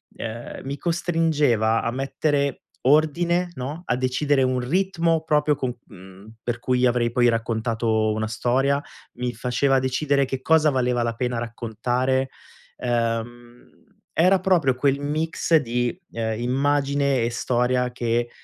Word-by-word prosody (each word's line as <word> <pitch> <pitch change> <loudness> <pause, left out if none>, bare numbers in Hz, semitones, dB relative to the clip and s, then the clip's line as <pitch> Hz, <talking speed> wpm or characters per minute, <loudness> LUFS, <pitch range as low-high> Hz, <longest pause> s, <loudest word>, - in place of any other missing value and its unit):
ehm, 115 +1 -7
mi 140 +1 -4
costringeva 150 -9 +1
a 115 - -1
mettere 140 +2 -1 0.2
ordine, 170 +5 +2
no, 145 +7 -5
a 125 - 0
decidere 130 +2 +1
un 130 0 +1
ritmo 165 +3 +1
proprio 150 -2 +2
co 125 -3 -4
mhmm, 95 +1 -14
per 120 0 -2
cui 125 +1 +1
avrei 120 -1 +2
poi 120 0 +3
raccontato 115 -1 0
una 110 0 -2
storia. 135 +5 +1 0.3
Mi 125 0 -3
faceva 125 +3 +1
decidere 140 +2 +1
che 130 0 -4
cosa 160 +1 +4
valeva 125 -2 +1
la 115 0 -1
pena 125 0 -2
raccontare. 120 +3 -1 0.5
Ehm, 120 0 -3 0.4
era 185 +3 +4
proprio 175 -8 +2
quel 140 +2 +1
mix 160 +3 0
di, 120 +1 -1
ehm, 110 -1 -3
immagine 140 +1 +1
e 115 - 0
storia 125 +1 0
che, 120 -1 -1
125 Hz, 135 wpm, -23 LUFS, 120-145 Hz, 0.5 s, cosa